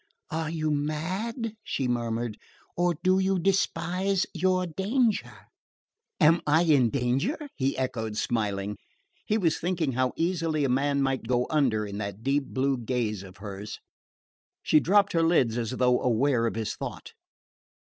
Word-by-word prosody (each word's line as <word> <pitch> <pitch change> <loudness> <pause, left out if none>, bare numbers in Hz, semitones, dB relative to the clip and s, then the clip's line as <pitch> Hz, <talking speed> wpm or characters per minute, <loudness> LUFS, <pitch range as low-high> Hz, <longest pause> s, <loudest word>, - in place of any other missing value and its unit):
"Are 160 -1 -2
you 155 -2 -1
mad," 185 - -2
she 130 - -2
murmured, 120 -2 -2 0.4
"or 175 0 +1
do 185 +1 +4
you 190 0 +2
despise 190 0 +1
your 185 -1 +1
danger?" 195 - 0 0.9
"Am 165 +3 +5
I 160 +3 +4
in 140 -8 +4
danger?" 135 - 0 0.2
he 135 +1 -1
echoed 115 -4 -2
smiling. 105 -3 -1 0.5
He 215 - +2
was 165 -7 +1
thinking 170 -5 0
how 130 0 0
easily 165 -3 0
a - - 0
man 140 +2 +1
might 135 -3 -1
go 125 0 +2
under 125 -9 +2
in 100 0 -6
that 100 +1 -5
deep 140 +1 +1
blue 135 0 0
gaze 115 -4 -2
of 95 -1 -12
hers. 100 0 -7 0.8
She 155 - +5
dropped 200 +5 +3
her 165 - +3
lids 165 -9 +3
as 115 -2 -2
though 125 0 +2
aware 125 0 +2
of 115 - -3
his 110 -2 -2
thought. - - -7
140 Hz, 150 wpm, -27 LUFS, 120-175 Hz, 0.9 s, Am